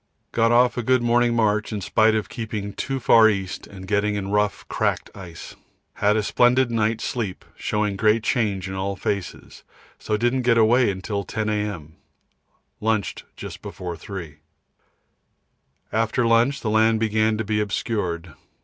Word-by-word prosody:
Got 115 0 +2
off 125 +1 +4
a - - +1
good 130 +1 +2
morning 120 0 +3
march 110 -1 +1
in 105 - -3
spite 110 +3 +3
of 105 -4 -1
keeping 105 -1 -5
too 135 -1 -3
far 115 -2 +6
east 95 -3 -3
and 95 -1 -11
getting 105 0 +1
in 100 -1 -3
rough, 105 0 0
cracked - - -1
ice. 90 -4 -10 0.4
Had 105 +1 +2
a 110 - +1
splendid 125 +3 +3
night 110 -1 +1
sleep, 105 -7 -4
showing 105 -2 -1
great 110 +2 +3
change 105 -7 0
in 95 - -5
all 95 +1 -2
faces, 100 -1 -5 0.4
so 105 - -1
didn't 120 +3 +1
get 120 -1 +3
away 115 +1 +4
till 100 +1 -3
10 110 0 -3
A.M. 105 -8 -3 0.8
Lunched 110 -2 -1
just - - -8
before 90 -2 -6
3. 85 -5 -8 1.5
After 115 +2 +1
lunch 115 +4 +3
the 110 - -1
land 110 +1 +3
began 110 0 +1
to 110 - -1
be 105 0 -1
obscured. 95 -5 -3
110 Hz, 160 wpm, -23 LUFS, 100-115 Hz, 1.5 s, far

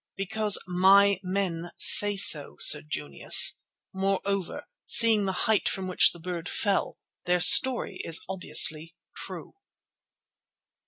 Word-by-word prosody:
"Because 205 +1 -1
my 190 +2 0
men 180 -3 -7
say 205 -1 +5
so, 150 -6 +2
Sir 150 - +3
Junius; 75 - 0 0.3
moreover, 195 -1 -6 0.2
seeing 220 -3 +2
the 190 - -5
height 220 -2 -3
from 190 -1 -8
which 185 - +2
the 170 - -16
bird 175 0 -10
fell, 200 -3 -5 0.3
their 180 0 -3
story 235 +1 +4
is 165 - 0
obviously 165 -3 0 0.2
true." - - -12
190 Hz, 115 wpm, -23 LUFS, 170-200 Hz, 0.3 s, say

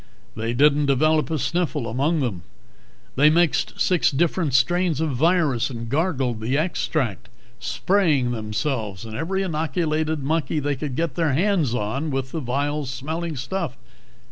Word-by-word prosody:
They 115 +2 -2
didn't 145 +2 +4
develop 155 +4 +2
a 160 - 0
sniffle 155 -4 -1
among 145 +8 0
them. 110 -10 -2 0.7
They 150 +3 +6
mixed 170 +1 +1
six 180 -3 +3
different 160 -1 0
strains 170 +4 +2
of 160 -2 0
virus 145 -3 +2
and 115 -3 -6
gargled 135 -6 0
the 125 +5 0
extract, 155 - -1 0.3
spraying 150 - +1
themselves 110 -2 -3
and 110 -1 -7
every 190 +8 -1
inoculated 155 -2 -1
monkey 155 +1 0
they 145 0 -1
could 140 -1 -4
get 165 -2 -1
their 160 -3 +1
hands 165 - +2
on 130 +8 -2
with 135 -2 -3
the 165 - -3
vile 145 +3 -1
smelling 160 +5 -4
stuff. 155 0 -3
145 Hz, 145 wpm, -23 LUFS, 125-165 Hz, 0.7 s, They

